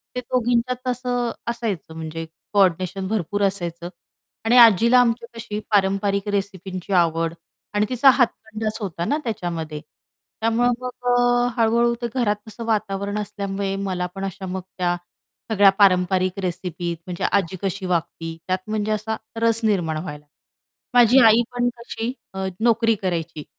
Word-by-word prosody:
ते 250 - 0
दोघींच्यात 245 +1 0
असं 245 -1 -1 0.2
असायचं 220 -9 -3
म्हणजे 160 0 -5 0.3
कोऑर्डिनेशन 185 0 +2
भरपूर 205 -1 -1
असायचं 175 -3 -2 0.6
आणि 235 +3 +4
आजीला 235 +1 +7
आमची 235 -1 +2
तशी 215 -2 -4
पारंपरिक 200 0 +1
रेसिपींची 195 -1 -3
आवड 165 -2 +2 0.4
आणि 210 +1 +2
तिचा 255 +2 +5
हातखंडाच 220 -4 0
होता 170 -3 -3
ना, 290 +8 +1
त्याच्यामध्ये 170 -9 -4 0.6
त्यामुळं 230 +2 +2
मग 250 0 -6
अ, 245 0 +3
हळू-हळू 235 +1 +3
ते 240 - -1
घरात 220 -5 +2
असं 225 +2 -8
वातावरण 205 -2 -1
असल्यामुळे 200 -1 -3
मला 185 -2 -2
पण 195 0 -3
अशा 195 0 -6
मग 185 0 -4 0.2
त्या 175 -1 +1 0.6
सगळ्या 205 -2 +6
पारंपरिक 185 -1 +3
रेसिपी 180 -1 -3
म्हणजे 180 -1 -5
आजी 190 -2 +1
कशी 195 0 -3
वागती, 165 -2 -2
त्यात 185 0 0
म्हणजे 215 0 -1
असा 215 +1 -1 0.3
रस 230 -1 +3
निर्माण 175 -7 +1
व्हायला 150 -3 -7 0.7
माझी 245 +1 +7
आई 225 +1 +6
पण 245 0 +1
कशी 235 0 -4 0.2
अ, 190 0 -2
नोकरी 230 0 +3
करायची. 165 -4 -3
200 Hz, 140 wpm, -22 LUFS, 180-230 Hz, 0.7 s, आजीला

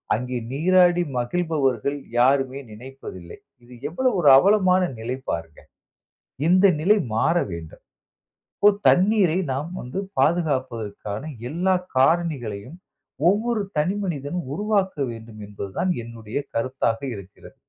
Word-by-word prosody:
அங்கே 125 +2 -3
நீராடி 175 +4 +4 0.2
மகிழ்பவர்கள் 140 -2 0 0.2
யாருமே 135 +1 +3
நினைப்பதில்லை. 105 -7 -10 0.3
இது 125 +1 -15 0.2
எவ்வளவு 250 +8 0
ஒரு 145 - +6
அவலமான 185 +1 +4 0.2
நிலை 125 +3 -3
பாருங்க. 80 -2 -4 0.9
இந்த 185 +2 +6
நிலை 205 +6 +4 0.2
மாறவேண்டும். 95 - -1 0.8
இப்போ 205 - +6 0.2
தண்ணீரை 185 -2 +3 0.2
நாம் 150 +6 -4
வந்து 125 +10 -4 0.2
பாதுகாப்பதற்கான 130 -10 -1 0.3
எல்லா 185 +4 +1 0.2
காரணிகளையும் 135 -5 0 0.5
ஒவ்வொரு 220 +2 +1 0.2
தனி 180 +6 +1
மனிதன் 150 -2 -3 0.2
உருவாக்க 205 0 0 0.2
வேண்டும் 115 -1 -10
என்பது 100 -1 -7
தான் 185 +1 +1
என்னுடைய 115 0 -7 0.2
கருத்தாக 115 -1 -1 0.2
இருக்கிறது. 100 -1 -13
140 Hz, 105 wpm, -23 LUFS, 115-180 Hz, 0.9 s, ஒரு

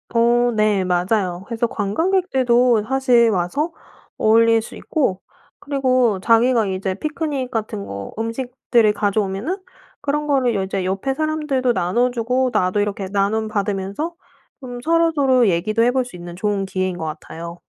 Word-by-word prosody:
어 240 +1 +3
네. 215 -2 +2
맞아요. 180 0 0
그래서 230 +1 -1
관광객들도 250 - +2
사실 250 -3 +3
와서 215 - -1 0.5
어울릴 225 +1 +4
수 - - -10
있고 195 -12 -1 0.4
그리고 255 -7 +1
자기가 230 +2 +3
이제 190 0 -2
피크닉 295 - -3
같은 215 -3 -3
거 100 0 -7
음식들을 230 -1 +1
가져오면은 205 - -1 0.4
그런 295 +1 -1
거를 265 -5 +1
이제 190 0 -3
옆의 195 +8 -1
사람들도 300 -4 0
나눠주고 245 +6 +1
나도 185 +3 +1
이렇게 205 -1 -2
나눔받으면서 205 - -1 0.5
좀 245 -2 -7
서로서로 290 -6 +3
얘기도 200 +6 +1
해볼 250 +1 +2
수 245 - -11
있는 175 0 -9
좋은 200 +1 -1
기회인 185 -1 -2
것 160 - -4
같아요. 165 +2 -7
230 Hz, 320 characters per minute, -20 LUFS, 195-260 Hz, 0.5 s, 어울릴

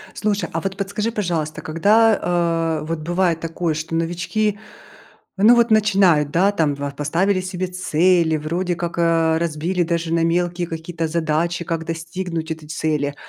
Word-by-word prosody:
Слушай, 205 -1 -1
а 165 -1 -2
вот 195 +2 -4
подскажи, 205 +3 -2
пожалуйста, 170 -8 -2
когда, 210 +7 +3 0.6
э, - - -6
вот 165 0 -3
бывает 175 +1 0
такое, 165 0 -2
что 155 +2 -4
новички, 175 +6 -1 0.8
ну, 230 +4 +7
вот 235 -1 +3
начинают, 195 -9 +4
да, 190 +5 +3
там 160 -7 0
в 140 0 -4
поставили 175 +7 +1
себе 185 0 -3
цели, 175 -2 +2
вроде 175 +4 -2
как, 170 0 -4
э, 165 -1 +3
разбили 170 +2 -1
даже 165 -1 -2
на 165 0 +2
мелкие 175 +1 0
какие-то 165 0 -4
задачи, 165 +1 -1
как 165 0 -3
достигнуть 165 0 -4
этой 160 -1 -6
цели. 150 -2 -1
170 Hz, 155 wpm, -21 LUFS, 160-185 Hz, 0.8 s, ну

